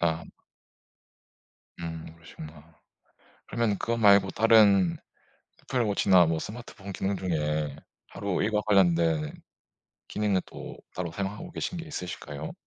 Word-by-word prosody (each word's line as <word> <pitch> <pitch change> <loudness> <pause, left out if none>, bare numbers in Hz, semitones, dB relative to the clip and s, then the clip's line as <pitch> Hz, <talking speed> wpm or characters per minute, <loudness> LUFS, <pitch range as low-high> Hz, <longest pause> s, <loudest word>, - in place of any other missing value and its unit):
아. 85 -1 +1 1.6
음. 80 -1 -6
그러시구나. 80 -1 -13 0.7
그러면 115 -4 0
그거 115 +3 -1
말고 100 -3 +6
다른 100 -5 +5 0.7
애플워치나 100 -7 +3
뭐 80 0 0
스마트폰 105 -1 -8
기능 95 +1 -1
중에 75 -4 -1 0.3
하루 100 -3 -2
일과 105 0 +1
관련된 85 -6 +3 0.8
기능은 105 -3 0
또 - - -9 0.2
따로 85 -3 -3
사용하고 100 - -5
계신 175 - -4
게 165 - -6
있으실까요? 85 - -6
95 Hz, 260 characters per minute, -28 LUFS, 80-105 Hz, 1.6 s, 말고